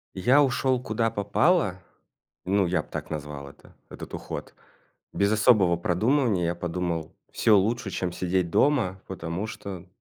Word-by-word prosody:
Я 125 Hz, +10 st, +4 dB
ушёл, 130 Hz, -2 st, +1 dB
куда 115 Hz, -1 st, -1 dB
попало. 105 Hz, -, +1 dB, 0.7 s
Ну, 100 Hz, +1 st, +2 dB
я 90 Hz, -2 st, +1 dB
б -, -, -19 dB
так -, -, -6 dB
назвал 75 Hz, -2 st, -6 dB
это, -, -, -19 dB
этот -, -, -10 dB
уход. -, -, -7 dB, 0.6 s
Без 100 Hz, +1 st, +1 dB
особого 105 Hz, -5 st, +4 dB
продумывания, 105 Hz, -, +1 dB
я 85 Hz, +1 st, -1 dB
подумал, 85 Hz, -2 st, -3 dB, 0.2 s
всё 110 Hz, -2 st, +4 dB
лучше, 110 Hz, +3 st, 0 dB
чем 90 Hz, -2 st, -2 dB
сидеть 90 Hz, -1 st, 0 dB
дома. 110 Hz, -, +2 dB
Потому 90 Hz, +2 st, -4 dB
что 95 Hz, -5 st, -8 dB
95 Hz, 145 wpm, -26 LUFS, 90-115 Hz, 0.7 s, Я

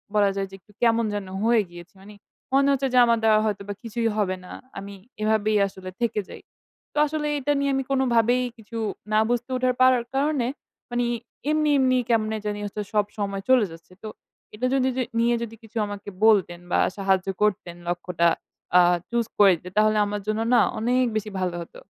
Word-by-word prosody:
বলা 205 Hz, -1 st, +4 dB
যায় 195 Hz, 0 st, -2 dB
যে -, -, -19 dB
একটু 210 Hz, -, -24 dB
কেমন 230 Hz, -1 st, +3 dB
যেন 205 Hz, -2 st, -4 dB, 0.2 s
হয়ে 230 Hz, 0 st, +4 dB
গিয়েছি। 175 Hz, 0 st, -13 dB
মানি 205 Hz, +2 st, -13 dB, 0.4 s
মনে 275 Hz, +1 st, +4 dB
হচ্ছে 270 Hz, 0 st, +1 dB
যে -, -, +3 dB
আমারা 235 Hz, -1 st, +2 dB
দ্বারা 215 Hz, -1 st, +5 dB
হয়তো 205 Hz, -2 st, -1 dB
বা 205 Hz, -, -1 dB
কিছুই 230 Hz, 0 st, -1 dB
হবে 185 Hz, -3 st, +1 dB
না। -, -, -11 dB, 0.3 s
আমি 200 Hz, +1 st, -7 dB, 0.3 s
এভাবেই 215 Hz, 0 st, +2 dB
আসলে 190 Hz, -1 st, -9 dB
থেকে 230 Hz, -2 st, 0 dB
যাই। -, -, -10 dB, 0.5 s
তো -, -, -9 dB
আসলে 300 Hz, 0 st, -2 dB
এটা 290 Hz, +2 st, +1 dB
নিয়ে 280 Hz, 0 st, +1 dB
আমি 270 Hz, -, 0 dB
কোনোভাবেই 245 Hz, -2 st, +3 dB
কিছু 225 Hz, +1 st, -9 dB, 0.4 s
না 215 Hz, -, +5 dB
বুঝতে 240 Hz, +1 st, -1 dB
ওঠার 255 Hz, 0 st, +1 dB
পারার 255 Hz, -2 st, +5 dB
কারণে, 275 Hz, -3 st, +1 dB, 0.4 s
মানি 240 Hz, 0 st, 0 dB, 0.4 s
এমনি, 305 Hz, 0 st, +2 dB
এমনি 255 Hz, -1 st, +3 dB
কেমনে 220 Hz, -1 st, +1 dB
জানি 205 Hz, 0 st, -2 dB
হচ্ছে 205 Hz, +1 st, -4 dB
সব 210 Hz, -1 st, +3 dB
সময় 200 Hz, -1 st, -2 dB
চলে 255 Hz, -4 st, +5 dB
যাচ্ছে। 165 Hz, +2 st, -14 dB
তো -, -, -5 dB, 0.5 s
এটা 245 Hz, -, -2 dB
যদি 260 Hz, -1 st, +2 dB
যে 255 Hz, -, +1 dB, 0.2 s
নিয়ে 235 Hz, +1 st, +3 dB
যদি 225 Hz, -1 st, -7 dB
কিছু 225 Hz, +1 st, -10 dB
আমাকে 205 Hz, 0 st, -7 dB, 0.2 s
বলতেন 190 Hz, -6 st, +3 dB
বা, -, -, +3 dB, 0.2 s
সাহায্য 195 Hz, -1 st, +1 dB
করতেন 185 Hz, -4 st, 0 dB
লক্ষ্যটা 175 Hz, -1 st, 0 dB, 0.5 s
আ -, -, +8 dB, 0.3 s
choose 235 Hz, -1 st, -1 dB
করে 200 Hz, -2 st, +8 dB
দিতেন 180 Hz, +3 st, -12 dB
তাহলে 215 Hz, 0 st, +4 dB
আমার 205 Hz, 0 st, -3 dB
জন্য 215 Hz, +1 st, 0 dB
না -, -, +6 dB, 0.2 s
অনেক 250 Hz, +3 st, +2 dB
বেশি 215 Hz, 0 st, -2 dB
ভালো 180 Hz, -2 st, -1 dB
হতো। 170 Hz, -, -11 dB
220 Hz, 195 wpm, -24 LUFS, 200-245 Hz, 0.5 s, আ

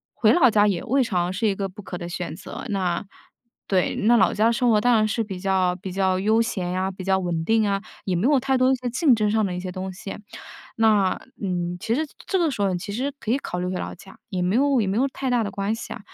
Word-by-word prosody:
回 -, -, +4 dB
老 275 Hz, -8 st, +6 dB
家 210 Hz, -1 st, +4 dB
也 190 Hz, -4 st, -1 dB
未 265 Hz, +3 st, +2 dB
尝 180 Hz, -6 st, 0 dB
是 195 Hz, +4 st, 0 dB
一 200 Hz, -, +2 dB
个 195 Hz, 0 st, -3 dB
不 200 Hz, +2 st, -12 dB
可 180 Hz, -, -6 dB
的 170 Hz, 0 st, -6 dB
选 170 Hz, -2 st, -5 dB
择。 190 Hz, -, -8 dB
那， 185 Hz, -3 st, -1 dB, 0.6 s
对， 185 Hz, -2 st, +1 dB
那 235 Hz, +3 st, +4 dB
老 -, -, +3 dB
家 220 Hz, +2 st, +3 dB
生 245 Hz, +1 st, +1 dB
活 215 Hz, -2 st, +4 dB
当 245 Hz, +1 st, +4 dB
然 215 Hz, -1 st, +3 dB
是 225 Hz, +2 st, -1 dB
比 195 Hz, -3 st, -6 dB
较 185 Hz, -1 st, +1 dB
比 190 Hz, 0 st, -7 dB
较 190 Hz, -1 st, +1 dB
悠 220 Hz, +4 st, +3 dB
闲 190 Hz, -6 st, -2 dB
啊， 190 Hz, +1 st, -1 dB
比 190 Hz, 0 st, -9 dB
较 190 Hz, 0 st, +3 dB
稳 170 Hz, -3 st, -2 dB
定 220 Hz, +1 st, +3 dB
啊， 200 Hz, -1 st, 0 dB, 0.2 s
也 190 Hz, -, -2 dB
没 175 Hz, -, 0 dB
有 285 Hz, -1 st, +4 dB
太 265 Hz, 0 st, +1 dB
多 255 Hz, 0 st, +4 dB
一 -, -, +3 dB
些 250 Hz, -1 st, -4 dB
竞 260 Hz, +2 st, +3 dB
争 210 Hz, -2 st, +1 dB
上 220 Hz, -1 st, +2 dB
的 180 Hz, -2 st, -3 dB
一 -, -, -3 dB
些 185 Hz, 0 st, -5 dB
东 190 Hz, +1 st, -5 dB
西。 195 Hz, +2 st, -7 dB, 0.6 s
那， 210 Hz, -4 st, +4 dB, 0.3 s
嗯， 175 Hz, -2 st, -2 dB
其 225 Hz, +5 st, -1 dB
实 310 Hz, +5 st, 0 dB, 0.2 s
这 385 Hz, -, +1 dB
个 335 Hz, -3 st, +2 dB
时 210 Hz, -7 st, -3 dB
候 190 Hz, -2 st, +1 dB
其 180 Hz, +3 st, -6 dB
实 265 Hz, +6 st, -2 dB
可 220 Hz, -, -4 dB
以 250 Hz, -, +3 dB
考 180 Hz, -, -5 dB
虑 180 Hz, -, -2 dB
回 185 Hz, -, -2 dB
老 -, -, -5 dB
家， 190 Hz, +2 st, -15 dB
也 185 Hz, -3 st, -2 dB
没 180 Hz, +4 st, +1 dB
有 275 Hz, -1 st, +3 dB
也 205 Hz, -, 0 dB
没 195 Hz, -, -1 dB
有 260 Hz, +4 st, +3 dB
太 265 Hz, 0 st, -4 dB
大 240 Hz, -2 st, +2 dB
的 200 Hz, -, -3 dB
关 200 Hz, +2 st, -2 dB
系 225 Hz, -, -7 dB
啊。 -, -, -7 dB
200 Hz, 300 characters per minute, -24 LUFS, 185-230 Hz, 0.6 s, 老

